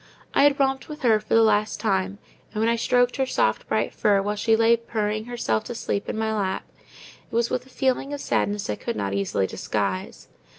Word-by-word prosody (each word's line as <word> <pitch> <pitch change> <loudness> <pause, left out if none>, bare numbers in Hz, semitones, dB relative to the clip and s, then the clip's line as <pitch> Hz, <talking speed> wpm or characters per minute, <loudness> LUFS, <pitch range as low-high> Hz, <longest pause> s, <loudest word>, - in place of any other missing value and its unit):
I 280 - +5
had 285 -1 +3
romped 270 +1 0
with 300 -2 -8
her 225 -3 +4
for 215 - -1
the 225 - +6
last 215 -1 +2
time; 195 -2 0 0.3
and 215 - -4
when 225 - +2
I 235 - +3
stroked 245 +2 +2
her 265 -1 +1
soft - - 0
bright - - 0
fur, 205 -1 +3
while 205 +2 -1
she 220 +2 +2
lay 225 +1 +5
purring 215 -2 -2
herself 235 - -1
to 240 - -6
sleep 200 -3 -3
in - - -3
my 220 0 0
lap, 195 -3 -1 0.7
it - - -5
was 235 0 +1
with 250 +1 -2
a - - -18
feeling 265 +1 0
of 290 - -4
sadness 205 -6 -1
I 105 - -2
could - - -4
not 100 -2 -2
easily 100 -1 0
disguise. 95 -1 -3
220 Hz, 220 wpm, -24 LUFS, 200-245 Hz, 0.7 s, the